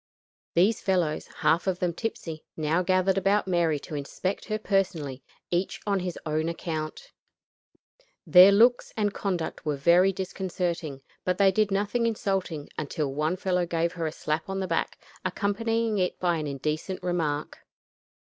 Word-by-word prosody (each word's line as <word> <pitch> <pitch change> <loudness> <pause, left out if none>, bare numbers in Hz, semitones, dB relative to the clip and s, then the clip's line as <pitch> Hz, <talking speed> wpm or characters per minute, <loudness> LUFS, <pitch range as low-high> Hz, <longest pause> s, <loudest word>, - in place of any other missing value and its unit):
These 195 +6 +3
fellows, 180 -5 0
half 160 +4 +1
of 185 -2 +1
them 180 -1 -1
tipsy, 165 -6 -5
now 160 +3 +1
gathered 185 +1 +2
about 200 +1 +2
Mary 170 -4 +2
to - - -10
inspect 150 +6 -3
her 215 -1 -1
personally, 180 -10 -1 0.3
each 180 +2 -1
on 200 -2 +1
his 180 -1 -4
own 155 +1 0
account. 165 - -5 1.1
Their 185 +2 +9
looks 235 +5 +4
and 205 -2 +1
conduct 185 -6 -3
were 150 -2 -1
very 170 +7 +5
disconcerting, 175 -6 -3 0.2
but 180 0 0
they 195 -1 +5
did 215 +2 +2
nothing 205 +4 +1
insulting 195 -8 -2
until 150 -2 -2
one 155 +5 0
fellow 180 -2 0
gave 170 0 0
her 165 -2 -2
a - - -3
slap 155 +2 -3
on 195 0 -2
the 190 - -1
back, 165 -1 -1 0.3
accompanying 220 +3 0
it 180 -1 -1
by 175 -2 +1
an 155 -1 -3
indecent 150 +6 -3
remark. 160 -5 -1
180 Hz, 155 wpm, -27 LUFS, 160-195 Hz, 1.1 s, Their